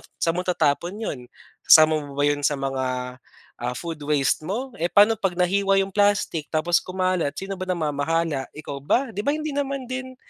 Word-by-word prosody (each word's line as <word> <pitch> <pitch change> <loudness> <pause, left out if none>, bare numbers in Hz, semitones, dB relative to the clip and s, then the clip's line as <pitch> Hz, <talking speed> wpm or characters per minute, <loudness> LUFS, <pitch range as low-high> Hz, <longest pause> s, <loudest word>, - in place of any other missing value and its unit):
saan 165 - +1
mo 175 +2 -2
tatapon 170 +1 0
'yon? 215 - -4 0.4
Kasama 155 0 +6
mo 145 -2 -9
ba 145 - 0
'yon 145 0 +2
sa 145 +1 +1
mga, 130 -2 -3 0.4
ah, 125 +1 -3
food 165 0 -6
waste 145 -3 +2
mo? 250 +8 -3
Eh, 170 - +1
paano 210 +4 +4
pag 195 -4 -1
nahiwa 195 +2 +2
yung 195 - -7
plastic, 200 -6 +1
tapos 170 +2 +1
kumalat, 185 -5 -1
sino 195 0 -6
ba 185 - -4
namamahala, 160 -3 -1
ikaw 145 -2 -7
ba? 235 - 0
'Di 205 - -7
ba 285 - +3
hindi 310 0 -4
naman 275 -1 -2
din? 260 0 -5
170 Hz, 185 wpm, -23 LUFS, 145-200 Hz, 0.4 s, Kasama